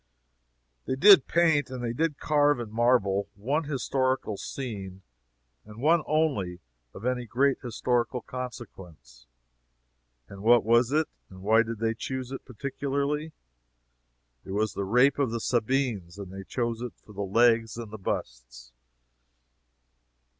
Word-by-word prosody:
They -, -, 0 dB
did 190 Hz, +1 st, +7 dB
paint, 160 Hz, -5 st, +2 dB
and 130 Hz, -1 st, -6 dB
they 115 Hz, -1 st, -2 dB
did 155 Hz, +2 st, -1 dB
carve 145 Hz, -3 st, +2 dB
in 115 Hz, -3 st, -6 dB
marble, 110 Hz, -4 st, +2 dB
one 140 Hz, +10 st, -1 dB
historical 130 Hz, -4 st, -1 dB
scene, 100 Hz, -6 st, -6 dB, 0.6 s
and 105 Hz, +1 st, -13 dB
one 160 Hz, +5 st, +4 dB
only, 135 Hz, -, 0 dB, 0.3 s
(of 105 Hz, -, -10 dB
any 125 Hz, -1 st, -1 dB
great 135 Hz, +4 st, +2 dB
historical 125 Hz, 0 st, -1 dB
consequence.) 95 Hz, -, -9 dB, 1.0 s
And 100 Hz, -1 st, -11 dB
what 120 Hz, +2 st, +5 dB
was 120 Hz, +2 st, +4 dB
it 155 Hz, +1 st, +2 dB, 0.2 s
and 95 Hz, 0 st, -13 dB
why 110 Hz, +3 st, +5 dB
did 115 Hz, 0 st, -4 dB
they 115 Hz, +1 st, 0 dB
choose 130 Hz, +2 st, -5 dB
it, 135 Hz, -, -6 dB
particularly? 140 Hz, +5 st, -3 dB, 1.1 s
It 95 Hz, -, -7 dB
was 105 Hz, -1 st, 0 dB
the 100 Hz, -, -3 dB
Rape 125 Hz, +8 st, +3 dB
of 140 Hz, -4 st, +2 dB
the 115 Hz, +1 st, -3 dB
Sabines, 115 Hz, -7 st, -1 dB
and 95 Hz, -2 st, -8 dB
they 95 Hz, 0 st, -8 dB
chose 115 Hz, 0 st, -2 dB
it 125 Hz, -1 st, -5 dB
for 105 Hz, -, -14 dB
the 100 Hz, -, -5 dB
legs 115 Hz, +3 st, +3 dB
and 115 Hz, -3 st, -7 dB
busts. -, -, -5 dB
120 Hz, 140 wpm, -27 LUFS, 100-135 Hz, 1.1 s, did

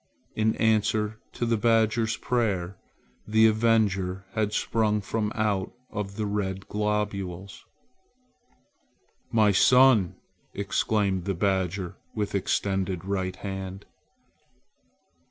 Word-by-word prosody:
In 110 Hz, 0 st, +1 dB
answer 110 Hz, 0 st, +1 dB
to 120 Hz, -, -2 dB
the 115 Hz, -1 st, +1 dB
badger's 110 Hz, 0 st, +2 dB
prayer, 100 Hz, -7 st, -1 dB, 0.5 s
the 110 Hz, +1 st, +4 dB
avenger 105 Hz, -4 st, +2 dB
had 105 Hz, -1 st, 0 dB
sprung 105 Hz, 0 st, +1 dB
from 105 Hz, +1 st, -2 dB
out 105 Hz, -4 st, -1 dB, 0.2 s
the 105 Hz, 0 st, -3 dB
red 95 Hz, -2 st, -3 dB
globules. 100 Hz, -3 st, -3 dB, 1.7 s
"My 110 Hz, -2 st, +4 dB
son!" 125 Hz, -2 st, +5 dB, 0.4 s
exclaimed 100 Hz, -2 st, 0 dB
the 100 Hz, -, -1 dB
badger 95 Hz, -1 st, -1 dB, 0.2 s
with 105 Hz, -2 st, -2 dB
extended 95 Hz, -2 st, -1 dB
right 95 Hz, -1 st, -2 dB
hand. 95 Hz, 0 st, -6 dB
105 Hz, 95 wpm, -26 LUFS, 95-110 Hz, 1.7 s, son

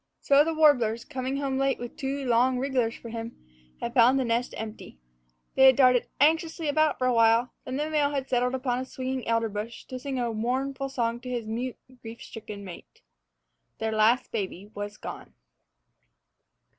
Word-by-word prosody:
So 280 Hz, +1 st, +5 dB
the 325 Hz, +1 st, -2 dB
warblers, 245 Hz, -8 st, +3 dB
coming 260 Hz, +1 st, -3 dB
home 270 Hz, -1 st, -1 dB
late 270 Hz, -1 st, +1 dB
with 240 Hz, 0 st, -8 dB
two 275 Hz, 0 st, -3 dB
long 250 Hz, +1 st, +3 dB
wrigglers 250 Hz, -3 st, 0 dB
for 230 Hz, -, -10 dB
him, 230 Hz, 0 st, -6 dB, 0.4 s
had 235 Hz, -, -4 dB
found 250 Hz, +1 st, +5 dB
the 265 Hz, -, +1 dB
nest 235 Hz, +1 st, -1 dB
empty. 220 Hz, -, -8 dB, 0.6 s
They 265 Hz, -, +5 dB
had 260 Hz, -, +7 dB
darted 250 Hz, -2 st, +4 dB
anxiously 320 Hz, +2 st, +2 dB
about 310 Hz, 0 st, +2 dB
it -, -, -28 dB
for 255 Hz, -, -1 dB
a 255 Hz, -, +3 dB
while, 230 Hz, +1 st, +4 dB
then 260 Hz, -, -3 dB
the 300 Hz, +1 st, -1 dB
male 300 Hz, -2 st, +1 dB
had 275 Hz, -2 st, -3 dB
settled 250 Hz, 0 st, +1 dB
upon 250 Hz, -1 st, -1 dB
a 260 Hz, -, -4 dB
swinging 260 Hz, 0 st, -4 dB
elder 230 Hz, 0 st, +1 dB
branch 215 Hz, +2 st, -6 dB
to 255 Hz, -, -5 dB
sing 270 Hz, 0 st, -4 dB
a 235 Hz, -2 st, -1 dB
mournful 265 Hz, +4 st, -2 dB
song 235 Hz, -3 st, -1 dB
to 250 Hz, -, -8 dB
his 240 Hz, -3 st, -3 dB
mute, 235 Hz, +3 st, -4 dB, 0.2 s
grief 225 Hz, 0 st, -9 dB
stricken 210 Hz, -3 st, -9 dB
mate. 180 Hz, -2 st, -12 dB, 0.7 s
Their 220 Hz, 0 st, -2 dB
last 220 Hz, +3 st, +3 dB
baby 200 Hz, -1 st, -4 dB
was 205 Hz, 0 st, -6 dB
gone. -, -, -9 dB
250 Hz, 185 wpm, -27 LUFS, 230-270 Hz, 0.7 s, had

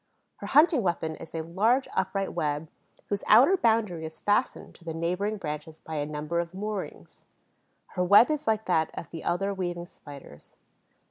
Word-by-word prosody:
Her -, -, -7 dB
hunting 300 Hz, 0 st, +5 dB
weapon 165 Hz, -4 st, -1 dB
is 165 Hz, -, -11 dB
a 160 Hz, -, -2 dB
large 220 Hz, +11 st, +1 dB
upright 195 Hz, +1 st, -1 dB
web, 150 Hz, +1 st, -2 dB, 0.4 s
whose 200 Hz, -1 st, -2 dB
outer 285 Hz, +11 st, +7 dB
boundary 220 Hz, -, +1 dB
is 160 Hz, 0 st, -7 dB
fastened 205 Hz, +5 st, 0 dB
to -, -, -19 dB
the 165 Hz, -1 st, -5 dB
neighboring 180 Hz, +6 st, -1 dB
branches 155 Hz, -2 st, -6 dB
by 160 Hz, -1 st, -6 dB
a 145 Hz, 0 st, -2 dB
number 150 Hz, +3 st, -3 dB
of 170 Hz, +1 st, -4 dB
moorings. 210 Hz, 0 st, -6 dB, 0.7 s
Her 180 Hz, -, -1 dB
web 205 Hz, +9 st, +6 dB
is 300 Hz, 0 st, -3 dB
like 220 Hz, 0 st, +1 dB
that 160 Hz, -3 st, +1 dB
of -, -, -7 dB
the 165 Hz, -, -7 dB
other 195 Hz, +3 st, 0 dB
weaving 175 Hz, -2 st, -4 dB
Spiders. 140 Hz, -, -13 dB
180 Hz, 175 wpm, -27 LUFS, 160-210 Hz, 0.7 s, outer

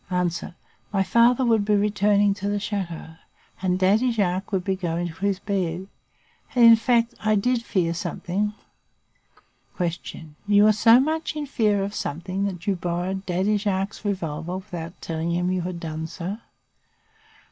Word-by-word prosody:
"A. 180 Hz, -1 st, +1 dB, 0.6 s
My 195 Hz, -1 st, +2 dB
father 235 Hz, +5 st, +4 dB
would 225 Hz, -3 st, +3 dB
be 210 Hz, 0 st, +2 dB
returning 205 Hz, 0 st, +3 dB
to 200 Hz, 0 st, -4 dB
the 205 Hz, 0 st, 0 dB
chateau 180 Hz, -6 st, -5 dB, 0.4 s
and 180 Hz, -1 st, +1 dB
Daddy 205 Hz, +7 st, +3 dB
Jacques 195 Hz, -3 st, -1 dB
would 190 Hz, -3 st, 0 dB
be 190 Hz, 0 st, 0 dB
going 175 Hz, -1 st, -2 dB
to -, -, -9 dB
his 200 Hz, -2 st, 0 dB
bed. 190 Hz, -3 st, -2 dB, 0.7 s
And, 240 Hz, -2 st, +6 dB
in 230 Hz, 0 st, +10 dB
fact, 235 Hz, +1 st, +2 dB
I 215 Hz, 0 st, +2 dB
did 245 Hz, +4 st, +1 dB
fear 180 Hz, -7 st, 0 dB
something. 195 Hz, +3 st, -2 dB, 1.2 s
"Q. 170 Hz, -3 st, -4 dB
You 205 Hz, 0 st, +5 dB
were 215 Hz, 0 st, +6 dB
so 225 Hz, +3 st, +6 dB
much 315 Hz, +3 st, -1 dB
in 300 Hz, -1 st, -3 dB
fear 210 Hz, -7 st, +1 dB
of 200 Hz, +1 st, -4 dB
something 185 Hz, +4 st, -3 dB
that 180 Hz, -3 st, -5 dB
you 200 Hz, -, +1 dB
borrowed 180 Hz, +2 st, -3 dB
Daddy 190 Hz, +4 st, +1 dB
Jacques's 200 Hz, 0 st, -2 dB
revolver 175 Hz, -4 st, -3 dB
without 175 Hz, -4 st, -7 dB
telling 165 Hz, +1 st, -2 dB
him 180 Hz, +1 st, 0 dB
you 185 Hz, -1 st, 0 dB
had 175 Hz, 0 st, -4 dB
done 160 Hz, -1 st, -4 dB
so? 185 Hz, +6 st, -5 dB
195 Hz, 160 wpm, -24 LUFS, 175-210 Hz, 1.2 s, in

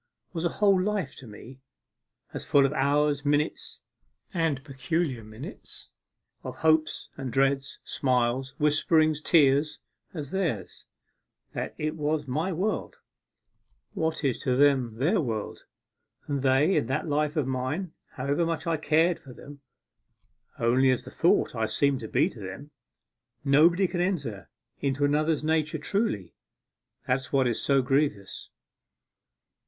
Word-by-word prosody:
was 165 Hz, -2 st, -3 dB
a 170 Hz, -, +2 dB
whole 200 Hz, -3 st, +4 dB
life 200 Hz, -7 st, -2 dB
to 130 Hz, -, -11 dB
me; 115 Hz, +5 st, -12 dB, 0.7 s
as -, -, -5 dB
full 140 Hz, -1 st, +4 dB
of 135 Hz, -, 0 dB
hours, 145 Hz, +1 st, +1 dB
minutes, 145 Hz, +1 st, -1 dB, 0.5 s
and 160 Hz, -6 st, 0 dB
peculiar 135 Hz, -1 st, -2 dB
minutes, 110 Hz, +4 st, -10 dB, 0.5 s
of -, -, -6 dB
hopes 155 Hz, -1 st, +1 dB
and 130 Hz, -2 st, -4 dB
dreads, 135 Hz, +1 st, +1 dB
smiles, 130 Hz, 0 st, 0 dB
whisperings, 155 Hz, +1 st, +2 dB
tears, 150 Hz, -2 st, +3 dB, 0.3 s
as 150 Hz, -5 st, -6 dB
theirs: 170 Hz, -, -3 dB, 0.7 s
that -, -, -4 dB
it 155 Hz, +1 st, -2 dB
was 150 Hz, -1 st, -1 dB
my 155 Hz, +9 st, -1 dB
world, 190 Hz, +5 st, -2 dB, 1.0 s
what 160 Hz, -1 st, -2 dB
is 135 Hz, -4 st, 0 dB
to 125 Hz, -, 0 dB
them 130 Hz, -4 st, +3 dB
their 165 Hz, -, +2 dB
world, 110 Hz, -6 st, -4 dB, 0.6 s
and 140 Hz, -2 st, -2 dB
they 135 Hz, +7 st, +3 dB
in -, -, 0 dB
that 130 Hz, +6 st, -2 dB
life 150 Hz, +1 st, 0 dB
of 150 Hz, -, +1 dB
mine, 135 Hz, +7 st, -3 dB, 0.2 s
however 140 Hz, +5 st, 0 dB
much 165 Hz, 0 st, -2 dB
I 165 Hz, -1 st, 0 dB
cared 160 Hz, +3 st, +2 dB
for 130 Hz, -, -13 dB
them, 140 Hz, +2 st, -12 dB, 1.0 s
only 125 Hz, +3 st, +3 dB
as 130 Hz, -, +1 dB
the -, -, -10 dB
thought -, -, +2 dB
I -, -, 0 dB
seem 140 Hz, -2 st, +1 dB
to 110 Hz, -, -6 dB
them 145 Hz, -, +2 dB, 0.3 s
to -, -, -10 dB
be. 145 Hz, -, -17 dB, 0.8 s
Nobody 170 Hz, +7 st, +5 dB
can 175 Hz, 0 st, -2 dB
enter 135 Hz, -, -2 dB, 0.3 s
into 140 Hz, +1 st, 0 dB
another's 155 Hz, +2 st, +1 dB
nature 155 Hz, 0 st, 0 dB
truly, 150 Hz, -, -2 dB, 0.7 s
that's 130 Hz, +1 st, -1 dB
what 135 Hz, -2 st, +3 dB
is 120 Hz, -3 st, 0 dB
so 135 Hz, -2 st, +2 dB
grievous. 135 Hz, -7 st, -1 dB
145 Hz, 140 wpm, -27 LUFS, 130-160 Hz, 1.0 s, Nobody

